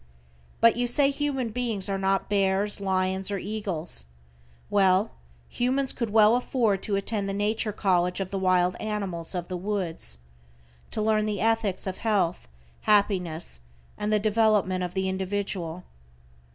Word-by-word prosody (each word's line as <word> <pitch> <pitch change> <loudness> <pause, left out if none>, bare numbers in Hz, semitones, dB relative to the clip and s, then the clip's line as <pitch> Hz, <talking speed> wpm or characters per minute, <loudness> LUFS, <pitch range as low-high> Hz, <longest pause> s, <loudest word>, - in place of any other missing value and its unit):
But 230 0 +6
you 245 0 +1
say 275 +3 +4
human 275 -4 -2
beings 225 -4 -1
are 195 -1 -1
not 195 0 +1
bears, 200 0 +2
lions, 190 0 0
or 200 - -1
eagles. 185 - -2 0.6
Well, 195 +1 +3 0.4
humans 260 +2 -1
could 235 -4 -3
well 215 +1 +5
afford 235 -5 +1
to 205 - -1
attend 200 0 -2
the - - -2
Nature 215 +2 0
College 180 -2 +1
of 190 -1 -3
the 195 - -2
wild 185 -1 +2
animals 195 -6 -3
of 175 -1 -3
the 185 - -4
woods, 175 - -3 0.7
to 215 - -2
learn 215 0 +2
the 210 -2 -2
ethics 225 -3 0
of 190 -1 -4
health, 200 - 0 0.4
happiness 180 - +1 0.3
and 210 +1 -2
the 215 - +4
development 210 -3 +2
of 180 +1 -5
the 190 0 0
individual. 190 -2 -2
200 Hz, 150 wpm, -26 LUFS, 185-215 Hz, 0.7 s, But